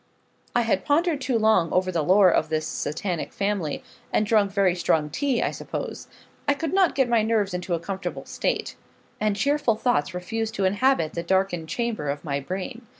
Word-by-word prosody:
I 240 - +4
had 220 -5 +1
pondered 310 0 +1
too 255 -2 +1
long 215 -7 +3
over 185 0 +1
the 170 -3 0
lore 185 +3 +5
of - - +1
this 155 0 -1
Satanic 170 +3 -3
family, 195 -7 -2 0.3
and 215 - +2
drunk 210 -3 +3
very 195 -3 +3
strong 160 -4 +1
tea, 270 - 0
I - - 0
suppose. - - -6 0.4
I 285 - +3
could 325 +3 -3
not 380 -3 +3
get 265 -2 +3
my 235 -2 +3
nerves 215 -3 +1
into 180 0 -2
a - - -3
comfortable 190 +3 -5
state, - - -2 0.4
and 210 -1 +1
cheerful 275 +1 +2
thoughts 220 -5 0
refused 220 +5 -3
to 195 - 0
inhabit 200 -4 +2
the 170 - -2
darkened 175 -2 0
chamber 225 -7 -2
of 145 +1 -3
my 140 -2 -1
brain. 195 - -6
200 Hz, 190 wpm, -25 LUFS, 175-235 Hz, 0.4 s, lore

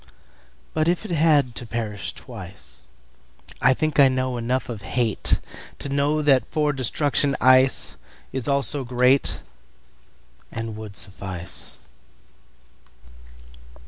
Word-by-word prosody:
But 155 0 0
if 175 +5 -1
it 205 - -7
had 150 -6 +2
to 120 - -8
perish 110 -3 -5
twice,I 65 - -6
think 155 +1 -2
I 140 - +7
know 130 -1 -2
enough 125 +2 -3
of 115 -4 -7
hateTo 120 +5 -2
know 145 +2 0
that 135 -3 +2
for 150 -2 -1
destruction 140 +2 0
iceIs 130 0 +1
also 140 0 +8
greatAnd 125 +2 +2 1.3
would 105 -2 -10
suffice. 95 -3 -3
130 Hz, 95 wpm, -22 LUFS, 110-145 Hz, 1.3 s, also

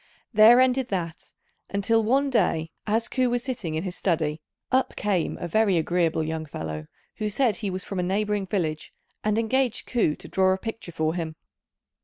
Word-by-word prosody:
There 220 +3 +8
ended 255 0 +3
that; 170 -6 -4 0.4
until 220 +3 +2
one 270 +5 +2
day, 160 -9 +1 0.2
as 225 +2 +1
Ku 255 -1 +1
was 245 0 0
sitting 215 - -3
in 160 - -2
his 185 -2 -4
study, 160 -4 0 0.3
up 260 0 +2
came 195 -5 0
a 175 - -4
very 200 0 +3
agreeable 165 -1 +1
young 160 0 -3
fellow, 80 - -5 0.3
who 215 -1 -1
said 230 +1 +1
he 210 -3 -3
was 185 0 -4
from 195 - -4
a - - +1
neighbouring 205 +1 0
village, 160 -6 -2 0.3
and 215 0 +1
engaged 245 +2 +1
Ku 220 -11 +1
to - - -11
draw 190 0 +3
a - - -1
picture 225 -3 -6
for 160 -1 0
him. 165 -2 -4
195 Hz, 185 wpm, -25 LUFS, 165-230 Hz, 0.4 s, There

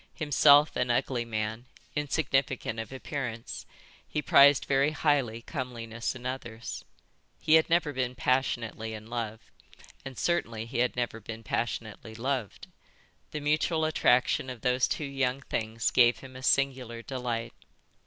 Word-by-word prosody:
Himself 145 -1 +5
an 125 0 0
ugly 120 0 0
man, 110 +1 -3 0.3
insignificant 135 -6 0
of 110 +1 -6
appearance, 130 -4 -5 0.4
he - - -2
prized 140 -1 +6
very 140 +1 +3
highly 135 -7 +1
comeliness 120 -5 -4
in 125 -1 -10
others. 120 -3 -5 0.6
He 155 - +2
had 160 +1 +6
never 165 -3 +2
been 125 -1 -2
passionately 120 -3 -1
in 110 0 -9
love, 115 -2 -3 0.6
and 135 -3 -8
certainly 115 -10 -1
he 115 +1 -4
had 125 0 +1
never 120 -2 -2
been 115 +1 -8
passionately 110 -1 -4
loved. 125 -3 -3 0.6
The 150 - -5
mutual 155 +2 +1
attraction 130 -4 +2
of 125 -3 -7
those 125 +1 +2
two 150 - -2
young 135 -1 -1
things 115 -3 -2
gave 120 -1 +5
him 130 -1 -12
a 130 - -8
singular 130 -4 +1
delight. 120 -3 -3
125 Hz, 140 wpm, -29 LUFS, 115-140 Hz, 0.6 s, prized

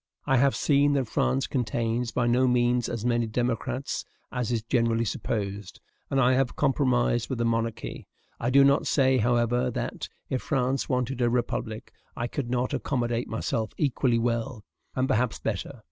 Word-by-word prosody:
I 135 -2 +3
have 135 +2 +3
seen 145 0 +3
that 135 -4 0
France 135 +4 +1
contains 120 -1 -1
by 125 - 0
no 125 +2 +3
means 120 -1 +2
as 115 -1 -4
many 120 -1 +1
democrats 120 +3 -2 0.3
as 125 -2 -2
is 115 -2 -1
generally 115 -1 +1
supposed, 100 -2 -3 0.3
and 135 - +1
I 130 0 +4
have 130 -1 +1
compromised 125 -4 +1
with 130 - -2
the 120 - 0
monarchy. 115 0 -2 0.3
I 120 - 0
do 140 +2 +6
not 140 +1 +3
say, 130 -2 +3
however, 120 +2 +2
that, - - -4 0.2
if 130 - -2
France 135 -1 0
wanted 125 -1 -1
a 120 - +3
republic, 115 -2 -2 0.2
I 120 - -1
could 120 0 -4
not 125 +1 -1
accommodate 120 -3 -1
myself 110 0 -2
equally 130 -4 +1
well, 115 -1 -1 0.3
and 130 0 +1
perhaps 120 -1 +1
better. - - -4
120 Hz, 165 wpm, -27 LUFS, 115-130 Hz, 0.3 s, do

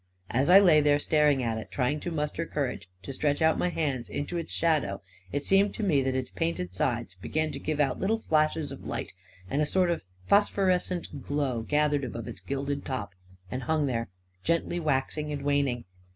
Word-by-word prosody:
As 135 +6 +2
I 185 - +10
lay 170 -6 +6
there 145 0 +4
staring 150 -3 +3
at 115 -1 -1
it, 110 - -9
trying 140 +3 0
to 175 - -4
muster 155 0 -2
cour 140 -4 -1
age - - -10
to 135 - -6
stretch 145 +1 0
out 160 0 +3
my 180 - +1
hand 140 -8 -2
into 145 +5 -4
its 170 -1 -3
shadow, 150 -13 +1 0.3
it 145 - -2
seemed 195 +1 +3
to 220 - -3
me 155 -9 +3
that 130 0 0
its 130 -5 -2
painted 90 0 -2
sides 115 0 -1
began 155 +12 -2
to - - -6
give 155 -1 -2
out 135 -3 +1
little 220 +4 +1
flashes 155 -5 +1
of - - -8
light, - - -4 0.3
and 140 +9 0
a - - +3
sort 180 0 +2
of 170 - -1 0.2
phosphorescent 185 -6 +1
glow 140 -5 -1
gathered 150 +2 +1
above 115 -3 -5
its - - -8
gilded 140 +1 -3
top, 115 -7 -4 0.4
and 130 - -3
hung 155 +1 +1
there, 115 -5 -2 0.3
gently 170 +1 0
waxing 150 0 -1
and 145 -1 -4
waning. 140 -4 +1
145 Hz, 200 wpm, -28 LUFS, 130-160 Hz, 0.4 s, I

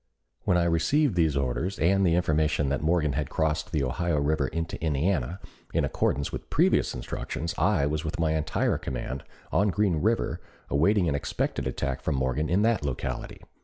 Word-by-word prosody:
When 90 - +3
I 85 - +3
received 115 - +2
these 80 -5 +2
orders 70 +9 -1
and 95 +5 +3
the 85 -3 +3
information 75 -4 +1
that 70 -1 -1
Morgan 80 -2 +2
had 75 -2 -2
crossed 80 0 -1
the 75 -5 0
Ohio 80 +5 0
River 70 -1 +1
into 80 +1 -4
Indiana, 85 +5 0 0.4
in - - +3
accordance 70 +2 0
with - - -7
previous - - +2
instructions 80 +6 -4
I 90 -7 +2
was 75 +2 -1
with 80 +1 -4
my 80 -1 +2
entire 80 -1 0
command 65 +1 -4 0.3
on 100 +2 +3
Green 100 -3 +1
River 110 +8 0 0.3
awaiting 90 +5 +3
an 75 - +1
expected 70 - -2
attack 70 -2 -2
from 80 - -1
Morgan 65 +3 0
in 95 +5 +3
that 115 -6 +2
locality. 70 -3 -4
80 Hz, 175 wpm, -27 LUFS, 70-90 Hz, 0.4 s, When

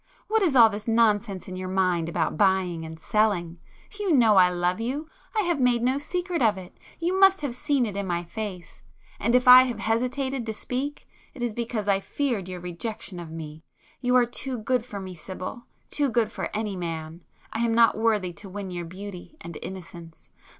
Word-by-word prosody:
—what 440 +1 +2
is 335 -8 +2
all 235 -3 +9
this 210 0 -6
nonsense 215 -4 +2
in 185 - -6
your 185 0 -5
mind 180 -3 +1
about 165 -1 -1
buying 185 -2 +2
and 160 0 -8
selling? 180 -4 0 0.4
You 405 -3 0
know 230 -8 +5
I 180 -1 +7
love 180 +3 -1
you,—I 300 - -4
have 345 -5 0
made 245 -2 +3
no 260 +3 +2
secret 355 +2 -2
of 215 -4 +3
it,—you 335 - -5
must 385 -2 +6
have 285 -5 -2
seen 280 0 +1
it 205 -3 -5
in 200 -1 -3
my 175 -1 -1
face,—and 205 +3 -5
if 250 +1 +3
I 250 0 +11
have 245 -4 -3
hesitated 250 +5 -1
to 220 - -3
speak, 270 +6 -4 0.3
it 245 - -5
is 240 -2 -1
because 230 -2 -3
I 195 -1 +3
feared 225 -4 -2
your 180 -1 -6
rejection 180 +2 -5
of 170 -2 -8
me. 160 -1 -8 0.4
You 250 -1 +2
are 250 -1 +6
too 250 +2 -4
good 235 +2 -1
for 205 - -6
me, 190 -1 -7
Sibyl,—too 195 - -4
good 230 -2 +1
for - - -4
any 210 -2 -2
man,—I 165 +4 -7
am 230 -1 +1
not 230 0 +5
worthy 215 -5 +1
to 195 +3 -11
win 195 0 -6
your 175 -1 -4
beauty 190 - -9
and 170 -10 -9
innocence. 170 -3 -10
215 Hz, 190 wpm, -26 LUFS, 180-250 Hz, 0.4 s, I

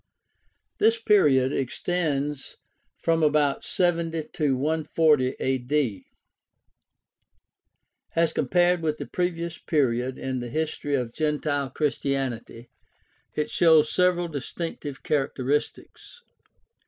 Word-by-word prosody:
— - - -47
This 225 +1 +3
period 145 - +4
extends 145 0 -2 0.4
from 165 -1 +1
about 150 -2 +2
70 165 -3 0
to 140 -4 +1
140 150 -2 +2
A.D. 130 -5 -1 2.1
As 165 -1 +2
compared 175 -1 +2
with 155 -1 -1
the - - -5
previous 170 -2 -3
period 130 -4 0
in 130 -1 -3
the 120 0 -5
history 150 0 -2
of 120 -3 -2
gentile 150 -2 -1
Christianity, 135 -5 -3 0.6
it 150 - -2
shows 160 -3 +4
several 180 -1 +2
distinctive 145 -1 -6
characteristics. 145 - -2
150 Hz, 95 wpm, -25 LUFS, 135-165 Hz, 2.1 s, period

